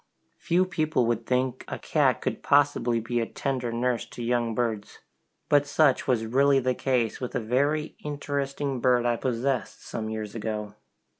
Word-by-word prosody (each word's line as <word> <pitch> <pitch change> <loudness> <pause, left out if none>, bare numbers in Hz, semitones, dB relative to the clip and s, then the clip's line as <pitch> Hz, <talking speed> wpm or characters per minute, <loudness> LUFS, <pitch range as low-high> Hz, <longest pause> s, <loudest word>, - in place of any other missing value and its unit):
Few 180 +2 +2
people 155 -7 0
would 115 0 -1
think 130 0 0
a - - -4
cat - - +1
could - - -2
possibly 140 -5 +3
be 120 +2 -2
a 115 - -1
tender 130 -4 -2
nurse 120 0 0
to 120 - -8
young 120 -1 0
birds! 110 -4 -2 0.5
but 145 0 +3
such 145 -2 +3
was 120 -4 +1
really 135 +4 +4
the 130 0 +1
case 125 -4 0
with 125 - -4
a - - +2
very 140 +7 0
interesting 140 -2 -3
bird 125 -1 +3
I 120 0 +2
possessed 130 +2 -2
some 110 -1 -4
years 110 -2 -5
ago. 105 -2 -4
125 Hz, 165 wpm, -27 LUFS, 115-140 Hz, 0.5 s, really